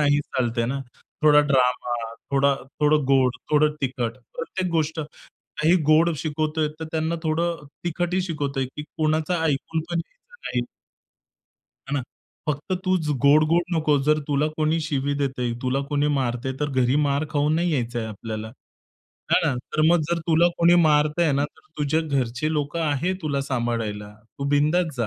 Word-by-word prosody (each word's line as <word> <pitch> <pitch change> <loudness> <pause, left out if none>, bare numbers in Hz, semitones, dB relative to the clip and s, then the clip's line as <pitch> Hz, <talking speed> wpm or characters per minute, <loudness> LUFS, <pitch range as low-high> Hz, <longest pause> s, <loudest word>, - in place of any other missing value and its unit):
नाही 145 -1 +3
चालते 120 -4 -1
ना. 135 +2 -2 0.4
थोडा 150 -1 +7
ड्रामा, 125 -1 +2 0.4
थोडा 140 0 +3 0.3
थोडं 150 -1 +3
गोड, 130 -2 +3
थोडं 150 0 +4
तिखट. 125 -3 -1 0.2
प्रत्येक 180 +2 -3
गोष्ट 160 0 0 0.6
काही 160 +4 +4
गोड 165 +2 +5
शिकवतोय, 155 0 -1
तर - - -3
त्यांना 160 +1 0
थोडं 165 0 -1 0.2
तिखट 175 +1 -1
ही 185 - +2
शिकवतोय, 145 -6 -2
की 150 +3 -8
कोणाचा 155 +2 -1
ऐकून 160 +2 0
पण 170 - 0
घ्यायचं 485 - -10
नाही. 120 -1 -1 1.2
हे - - -5
ना? 140 - +1 0.5
फक्त 150 +5 -2
तूच 185 -4 +1 0.2
गोड-गोड 155 +4 +5
नकोस. 150 -3 +2
जर 155 0 +4
तुला 145 +1 +2
कोणी 155 +1 +1
शिवी 145 -2 -1
देतं 135 -3 -2
आहे, 120 -1 0
तुला 130 +2 0
कोणी 145 0 +1
मारतं 125 0 -2
आहे, 130 - -4
तर 145 - 0
घरी 125 +3 +3
मार 140 +2 +1
खाऊन 150 +1 +1
नाही 170 0 +1
यायचं 120 -3 -1
आहे 110 -1 -3
आपल्याला, 110 +1 -6 0.8
आहे - - +5
ना. 140 - +1 0.2
तर 155 - +1
मग 175 0 +4
जर 170 - +1
तुला 170 +2 +5
कोणी 170 +1 +6
मारतं 150 +2 +3
आहे 155 -4 +3
ना, 140 +1 +1
तर 145 - -10 0.2
तुझ्या 150 +2 +1
घरचे 140 -1 -1
लोकं 150 +2 -2
आहे 155 +5 0
तुला 140 -3 -1
सांभाळायला. 115 -5 -2 0.3
तू 140 - -3
बिंदास 155 +2 +2
जा, 115 - 0
150 Hz, 170 wpm, -24 LUFS, 135-160 Hz, 1.2 s, थोडा